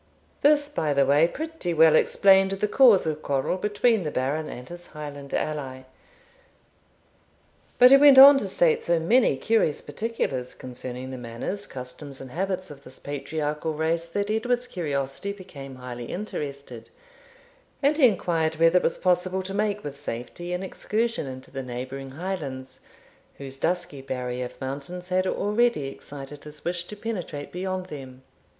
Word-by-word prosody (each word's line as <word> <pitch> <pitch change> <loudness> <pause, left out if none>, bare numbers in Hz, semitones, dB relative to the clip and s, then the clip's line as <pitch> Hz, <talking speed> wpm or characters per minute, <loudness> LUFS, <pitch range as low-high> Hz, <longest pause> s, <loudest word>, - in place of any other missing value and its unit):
This, 290 0 +4
by 155 - -1
the 140 0 +4
way, 145 +4 +4
pretty 310 - -4
well 160 0 +6
explained 190 +3 +5
the 195 +2 -1
cause 235 -4 +6
of 155 -1 -2
quarrel 140 +4 0
between 210 +3 +1
the 155 - -2
Baron 145 +3 -2
and 125 +1 -8
his 175 0 -10
Highland 145 -2 -8
ally. 135 -4 -3 1.9
But 250 +1 +8
he 275 - +10
went 280 -1 +7
on 275 +1 +11
to 200 - -3
state 175 -4 +2
so 170 -1 +2
many 195 - +3
curious 215 -2 +1
particulars 145 - -3
concerning 125 0 -7
the 130 - -6
manners, 120 - -5
customs, 130 +2 -8
and 130 -2 -9
habits 185 +1 -3
of 140 -1 -12
this 130 - -12
patriarchal 150 +2 -3
race 165 +2 -1
that 200 +4 -2
Edward's 245 +3 0
curiosity 145 - -3
became 140 -9 -10
highly 125 -1 -7
interested, 140 - -6 0.9
and 285 +2 +4
he 290 -5 +6
inquired 165 -6 0
whether 165 +2 +4
it - - +1
was - - 0
possible 185 +1 +1
to 195 +1 -5
make 210 0 -1
with 145 -1 -6
safety 140 +7 -6
an 180 +1 -2
excursion 225 -1 -2
into 130 0 -9
the 135 - -4
neighbouring 130 +2 -6
Highlands, 140 -5 -5 0.6
whose 135 -1 -7
dusky 175 -2 -1
barrier 125 -1 -4
of 125 - -11
mountains 145 +7 -6
had 185 +1 +1
already 210 - +1
excited 140 +1 -10
his 150 0 -13
wish 175 0 -2
to 210 - -9
penetrate 200 -9 -5
beyond 185 0 -3
them. 130 -6 -10
160 Hz, 155 wpm, -25 LUFS, 135-195 Hz, 1.9 s, on